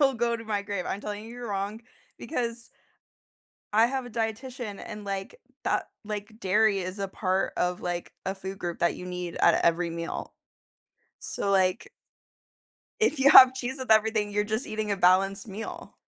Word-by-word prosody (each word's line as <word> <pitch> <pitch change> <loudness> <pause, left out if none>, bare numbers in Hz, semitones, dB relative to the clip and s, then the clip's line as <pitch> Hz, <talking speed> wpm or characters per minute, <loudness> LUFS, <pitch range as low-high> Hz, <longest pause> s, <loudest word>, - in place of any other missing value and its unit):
I'll 270 -2 +4
go 235 0 0
to 225 - -9
my 210 -2 -1
grave. 200 -3 -3
I'm 200 - -3
telling 210 0 -5
you 225 - -10
you're 240 0 -7
wrong 200 +2 -3 0.4
because, 235 -5 -4 1.1
I 225 +2 +6
have 265 0 -2
a - - -8
dietitian 225 -1 -4
and 210 -1 -7
like 195 - -5 0.2
that - - 0 0.2
like 210 +1 -6
dairy 205 +1 +3
is 185 +2 -5
a 195 - -1
part 190 0 -1
of 180 0 0
like 175 -1 -4
a 190 +1 -2
food 190 +1 -7
group 175 -2 -3
that 170 - +2
you - - -8
need 180 -1 -5
at - - +4
every 170 +1 +2
meal. 170 0 -5 0.9
So 200 - -2
like 190 +1 +2 1.1
If 435 -10 +2
you 270 +1 +6
have 260 -3 +10
cheese 260 0 -3
with 260 -3 -6
everything, 220 -1 +3
you're 210 0 +1
just 220 +4 -2
eating 215 -1 -3
a 200 - +1
balanced 195 +3 +3
meal. 210 +3 -7
210 Hz, 180 wpm, -27 LUFS, 190-230 Hz, 1.1 s, have